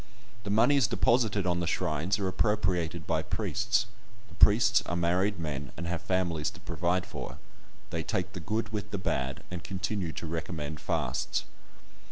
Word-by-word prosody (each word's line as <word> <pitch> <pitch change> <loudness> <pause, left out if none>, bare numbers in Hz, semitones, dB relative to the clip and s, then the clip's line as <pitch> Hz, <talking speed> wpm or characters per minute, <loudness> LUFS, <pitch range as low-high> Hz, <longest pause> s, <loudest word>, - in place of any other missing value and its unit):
The - - -3
moneys 120 +4 +5
deposited 115 -4 +2
upon 90 -1 +1
the 85 - -1
shrines 85 +3 0
are 100 -2 -1
appropriated 95 -4 +1
by - - +1
priests; 110 +2 0 0.4
the - - -15
priests 110 +4 +6
are 85 - -1
married 90 +4 +2
men, 75 -5 -4
and 85 - -4
have 85 0 -2
families 90 -4 0
to - - -13
provide 90 +1 0
for; - - -7 0.5
they 85 - -1
"take 90 +2 -2
the - - -5
good 110 +7 -1
with 105 -1 -4
the 100 - -2
bad," 65 -8 -2
and 90 -2 -5
continue 95 -2 -2
to - - -5
recommend 80 -2 -4
fasts. - - -1
90 Hz, 165 wpm, -30 LUFS, 85-105 Hz, 0.5 s, priests